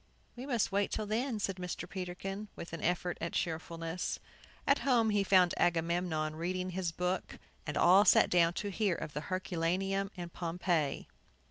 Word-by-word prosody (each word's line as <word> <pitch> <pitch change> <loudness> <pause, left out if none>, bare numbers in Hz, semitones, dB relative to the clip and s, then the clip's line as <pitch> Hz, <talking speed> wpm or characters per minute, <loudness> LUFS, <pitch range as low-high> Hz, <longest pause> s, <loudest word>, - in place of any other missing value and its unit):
"We 250 +3 -7
must 240 -6 +1
wait 200 0 +1
till 215 - -2
then," 225 +2 -1
said 195 -2 -2
Mr. 180 -1 -5
Peterkin, 195 +3 -5
with 170 - -8
an 165 - -5
effort 175 +1 -1
at 170 - -3
cheerfulness. 165 +1 -2 0.5
At 280 - +4
home 235 -5 +3
he 205 -1 +2
found 185 -2 +5
Agamemnon 165 -2 +1
reading 185 +2 -2
his 180 -2 -2
book, 180 +2 -2 0.3
and 150 -1 -2
all 185 +3 +7
sat - - +6
down 170 -1 +4
to 205 +3 -3
hear 195 -2 +1
of 150 - -6
Herculaneum 185 +4 -1
and 175 -1 -6
Pompeii. 170 -3 -1
180 Hz, 160 wpm, -33 LUFS, 170-195 Hz, 0.5 s, all